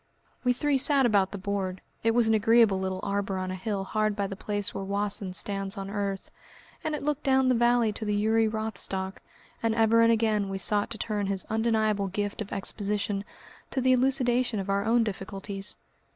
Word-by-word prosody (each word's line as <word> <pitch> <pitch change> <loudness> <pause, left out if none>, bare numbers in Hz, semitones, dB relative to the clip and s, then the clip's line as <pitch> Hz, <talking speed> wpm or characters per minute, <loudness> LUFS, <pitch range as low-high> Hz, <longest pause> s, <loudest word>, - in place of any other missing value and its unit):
We 250 - +3
three 280 +2 +1
sat 275 0 +4
about 200 -5 +3
the 200 - -5
board 190 -1 -3 0.2
it 225 0 +2
was 240 -2 +4
in 220 - +3
an - - +5
agreeable 225 -3 +4
little 190 0 -3
arbour 200 -1 -1
on 185 0 -3
a - - -3
hill 195 +1 -3
hard 215 +1 0
by 200 -1 -1
the 195 - -5
place 205 0 -3
where 195 - -4
Wassen 200 -1 -1
stands 195 0 -2
on 195 0 -5
earth, 200 -2 -3 0.5
and 310 -1 -1
it 295 - -6
looked 295 0 -1
down 265 -2 +3
the - - +4
valley 240 -2 +3
to 215 - -7
the 210 -1 0
Uri 220 +2 +2
Rothstock, 215 -3 -3 0.4
and 225 -1 +1
ever 225 0 +4
and 230 0 +5
again 215 -3 +1
we 195 - -3
sought 205 +1 +4
to 230 - -6
turn 210 -2 -2
his 195 -1 0
undeniable 220 -2 +1
gift 205 +3 -3
of 205 - -6
exposition 200 0 -2 0.5
to - - -2
the 260 0 +3
elucidation 250 -3 +2
of 195 0 -3
our 200 0 +1
own 230 +1 +3
difficulties. 195 -1 -5
210 Hz, 205 wpm, -27 LUFS, 195-230 Hz, 0.5 s, an